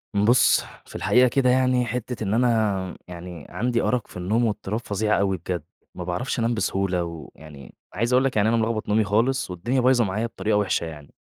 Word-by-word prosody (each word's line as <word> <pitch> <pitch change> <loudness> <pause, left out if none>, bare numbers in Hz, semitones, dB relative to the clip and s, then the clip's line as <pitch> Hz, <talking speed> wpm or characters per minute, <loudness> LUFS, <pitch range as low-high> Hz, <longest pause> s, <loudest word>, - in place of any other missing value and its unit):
بُص، 115 +4 +4 0.2
في - - -15
الحقيقة 125 +1 +4
كده 125 +1 +2
يعني، 125 -1 +3
حتَّة 120 -1 -4
إن 100 0 -1
أنا 110 -6 +1
يعني 90 -3 -9
عندي 120 -1 -1
أرق 125 -3 0
في - - -11
النوم 105 +7 +1
واضطراب 105 0 -2
فظيع 105 -1 0
أوي 95 -1 +1
بجد، 85 -1 -4 0.3
ما 90 - -5
باعرفش 90 +10 -3
أنام 115 +1 +1
بسهولة. 95 -5 0
ويعني 80 -3 -10 0.2
عايِز 115 +5 0
أقول 130 +1 +4
لك 135 - -1
يعني 105 +1 +3
أنا 115 - +2
ملخبَط 110 -1 -1
نومي 110 +1 +3
خالص، 115 +3 0
والدنيا 120 +9 -1
بايظة 125 -1 +4
معايا 105 +4 -2
بطريقة 110 -2 -1
وحِشة 100 -4 0
يعني، 75 -3 -10
110 Hz, 190 wpm, -24 LUFS, 95-120 Hz, 0.3 s, بُص